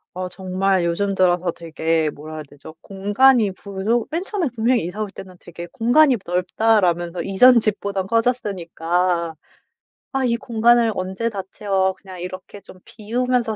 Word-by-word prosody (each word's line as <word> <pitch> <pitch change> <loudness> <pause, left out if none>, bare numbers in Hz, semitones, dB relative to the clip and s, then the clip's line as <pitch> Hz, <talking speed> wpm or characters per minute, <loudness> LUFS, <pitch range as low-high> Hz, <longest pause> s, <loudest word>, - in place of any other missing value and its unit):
어 185 0 -3
정말 185 0 -1
요즘 195 +4 0
들어서 180 -2 +2
되게 160 -1 -1
뭐라 155 +2 -10
해야 155 - -6
되죠? 145 +2 -13
공간이 205 +3 +3
부족 200 +5 -2
맨 330 +4 -2
처음에 390 -4 -2
분명히 235 -2 +1
이사 185 +5 -5
올 205 - -6
때는 185 -1 -11
되게 175 0 -10
'공간이 260 +2 +4
넓다.'라면서 180 -1 +1
이전 235 +7 +5
집보단 200 -3 -1
커졌으니까 180 -7 -1 0.8
'아 270 - 0
이 235 -1 +1
공간을 235 0 +2
언제 190 +5 -2
다 200 -3 -5
채워. 195 -2 0
그냥 185 -2 -12
이렇게 185 +2 -8
좀 185 - -15
비우면서 235 +1 -1
195 Hz, 325 characters per minute, -21 LUFS, 180-230 Hz, 0.8 s, 이전